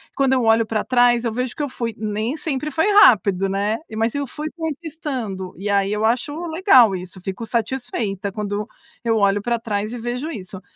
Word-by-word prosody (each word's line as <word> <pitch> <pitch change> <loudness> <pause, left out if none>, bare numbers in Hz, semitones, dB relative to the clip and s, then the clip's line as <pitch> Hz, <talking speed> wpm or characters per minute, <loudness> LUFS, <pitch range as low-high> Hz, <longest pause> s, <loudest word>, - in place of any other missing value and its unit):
quando 270 -1 +2
eu 255 -2 +2
olho 225 0 +4
para 220 -1 -1
trás, 245 -1 +3
eu 230 - -1
vejo 250 +1 -3
que 295 - -3
eu 285 - -2
fui 235 -2 -3
nem 215 +6 -2
sempre 300 -1 -2
foi 320 +6 +1
rápido, 195 - +5
né? 205 +3 0 0.2
Mas 225 +1 +1
eu 285 -1 -2
fui 300 +4 -5
conquistando 290 - -5
e 200 +3 -4
aí 200 0 +2
eu 210 +1 0
acho 240 +5 0 0.2
legal 260 - +5
isso. 185 +1 -8
Fico 195 +5 -5
satisfeita 225 -5 -2
quando 205 0 -3 0.4
eu 225 -1 +2
olho 200 0 +2
para 240 +2 0
trás 210 -1 -3
e - - -4
vejo 245 +6 -3
isso, 190 - -8
230 Hz, 195 wpm, -21 LUFS, 205-260 Hz, 0.4 s, rápido